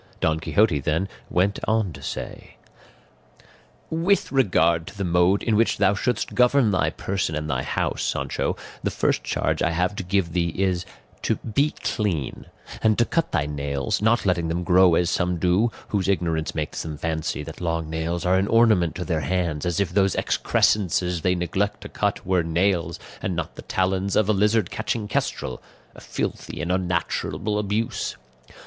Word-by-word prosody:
Don 80 Hz, 0 st, +1 dB
Quixote, 80 Hz, +1 st, +2 dB
then, 80 Hz, +7 st, 0 dB, 0.2 s
went 95 Hz, +3 st, +1 dB
on 110 Hz, -5 st, +1 dB
to 70 Hz, -, -11 dB
say: -, -, -6 dB, 1.4 s
"With 170 Hz, +5 st, +1 dB
regard 85 Hz, -10 st, +3 dB
to -, -, -10 dB
the 100 Hz, -, -2 dB
mode 90 Hz, +2 st, +3 dB
in 115 Hz, -, +2 dB
which 115 Hz, +2 st, +2 dB
thou 95 Hz, -, +4 dB
shouldst 110 Hz, +2 st, -1 dB
govern 125 Hz, -2 st, +4 dB
thy 95 Hz, -, +2 dB
person 95 Hz, -5 st, -2 dB
and 75 Hz, 0 st, -3 dB
thy 70 Hz, -4 st, -1 dB
house, -, -, -2 dB
Sancho, -, -, -1 dB, 0.2 s
the -, -, 0 dB
first -, -, 0 dB
charge -, -, -1 dB
I -, -, +3 dB
have 90 Hz, +4 st, 0 dB
to -, -, -3 dB
give 90 Hz, -2 st, 0 dB
thee 85 Hz, -1 st, +1 dB
is 95 Hz, -2 st, 0 dB, 0.3 s
to -, -, +1 dB
be 140 Hz, +7 st, 0 dB
clean, 90 Hz, -10 st, -2 dB, 0.3 s
and 110 Hz, -1 st, +3 dB
to 120 Hz, -, +4 dB
cut 165 Hz, +3 st, 0 dB
thy 75 Hz, -4 st, +1 dB
nails, 70 Hz, -1 st, -2 dB
not 110 Hz, +1 st, +2 dB
letting 90 Hz, -3 st, +1 dB
them 85 Hz, +2 st, -1 dB
grow 90 Hz, -1 st, +5 dB
as 85 Hz, +1 st, +2 dB
some 90 Hz, -1 st, 0 dB
do, 90 Hz, +7 st, +2 dB, 0.2 s
whose 100 Hz, -3 st, 0 dB
ignorance 85 Hz, -5 st, 0 dB
makes 75 Hz, -2 st, -3 dB
them 75 Hz, -2 st, -5 dB
fancy 80 Hz, -1 st, -2 dB
that 80 Hz, +2 st, -9 dB
long 85 Hz, -2 st, -1 dB
nails 80 Hz, +3 st, -2 dB
are 90 Hz, +1 st, +4 dB
an 95 Hz, -, 0 dB
ornament 110 Hz, -8 st, +4 dB
to 90 Hz, 0 st, -4 dB
their 80 Hz, -4 st, -1 dB
hands, 85 Hz, 0 st, -1 dB
as 85 Hz, +1 st, 0 dB
if 100 Hz, -4 st, 0 dB
those 95 Hz, 0 st, +2 dB
excrescences 90 Hz, -4 st, +1 dB
they 90 Hz, +2 st, +2 dB
neglect 95 Hz, +4 st, -1 dB
to -, -, -8 dB
cut -, -, -1 dB
were 95 Hz, -1 st, +2 dB
nails, 85 Hz, 0 st, 0 dB, 0.2 s
and 95 Hz, -, -2 dB
not 80 Hz, -2 st, -3 dB
the -, -, -9 dB
talons 95 Hz, +1 st, 0 dB
of 110 Hz, -, +3 dB
a 110 Hz, -, +3 dB
lizard 105 Hz, 0 st, +2 dB
catching 110 Hz, -1 st, -2 dB
kestrel 65 Hz, -9 st, -2 dB, 0.3 s
a -, -, -13 dB
filthy -, -, -4 dB
and 85 Hz, -, -2 dB
unnatural 95 Hz, +3 st, -1 dB
abuse. 105 Hz, +2 st, -2 dB
90 Hz, 180 wpm, -24 LUFS, 80-105 Hz, 1.4 s, grow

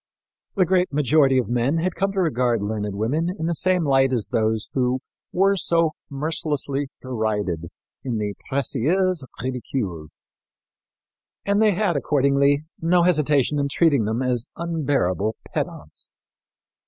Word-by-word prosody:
The 190 Hz, -3 st, +4 dB
great 180 Hz, 0 st, +2 dB
majority 145 Hz, -1 st, +3 dB
of 125 Hz, -, +1 dB
men 125 Hz, +6 st, +1 dB
had 175 Hz, +2 st, 0 dB
come 195 Hz, 0 st, 0 dB
to 195 Hz, -, -1 dB
regard 125 Hz, -, +1 dB
learned 105 Hz, -1 st, -3 dB
women 140 Hz, -, 0 dB
in 160 Hz, -, -3 dB
the 170 Hz, -, 0 dB
same 180 Hz, 0 st, +1 dB
light 135 Hz, -1 st, +3 dB
as 120 Hz, -5 st, 0 dB
those 110 Hz, -1 st, 0 dB
who 130 Hz, 0 st, +1 dB, 0.3 s
were 195 Hz, +2 st, +3 dB
so 165 Hz, -3 st, +2 dB, 0.2 s
mercilessly 145 Hz, -1 st, -2 dB, 0.2 s
derided 105 Hz, -9 st, -2 dB, 0.4 s
in 125 Hz, -4 st, -2 dB
the 105 Hz, -1 st, -2 dB, 0.2 s
Précieuses 150 Hz, +6 st, +1 dB, 0.2 s
Ridicules; 115 Hz, -, -3 dB, 1.4 s
and 200 Hz, +1 st, +2 dB
they 215 Hz, -2 st, +4 dB
had, 190 Hz, -2 st, 0 dB
accordingly, 140 Hz, +1 st, +2 dB
no 170 Hz, +1 st, +3 dB
hesitation 150 Hz, -4 st, +2 dB
in 140 Hz, -, +1 dB
treating 140 Hz, -7 st, +3 dB
them 110 Hz, +4 st, -1 dB
as 125 Hz, 0 st, -1 dB
unbearable 140 Hz, -, 0 dB, 0.2 s
pedants. -, -, -4 dB
140 Hz, 135 wpm, -23 LUFS, 120-165 Hz, 1.4 s, The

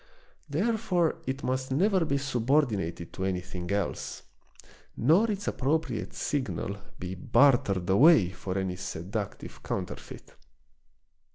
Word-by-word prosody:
Therefore 185 Hz, 0 st, +1 dB
it 135 Hz, +1 st, -3 dB
must 130 Hz, +1 st, -1 dB
never 185 Hz, +6 st, +3 dB
be 140 Hz, -2 st, +1 dB
subordinated 120 Hz, -, 0 dB
to 95 Hz, -, -4 dB
anything 90 Hz, -1 st, -3 dB
else, 100 Hz, 0 st, -2 dB, 0.7 s
nor 170 Hz, -, +4 dB
its 205 Hz, -1 st, -3 dB
appropriate 135 Hz, -5 st, -1 dB
signal 130 Hz, -8 st, -2 dB, 0.2 s
be 90 Hz, 0 st, -5 dB
bartered 100 Hz, -3 st, +3 dB
away 105 Hz, -, +6 dB
for 95 Hz, 0 st, -4 dB
any 95 Hz, -1 st, -2 dB
seductive 95 Hz, +4 st, -5 dB
counterfeit. -, -, -6 dB
125 Hz, 105 wpm, -28 LUFS, 95-155 Hz, 0.7 s, away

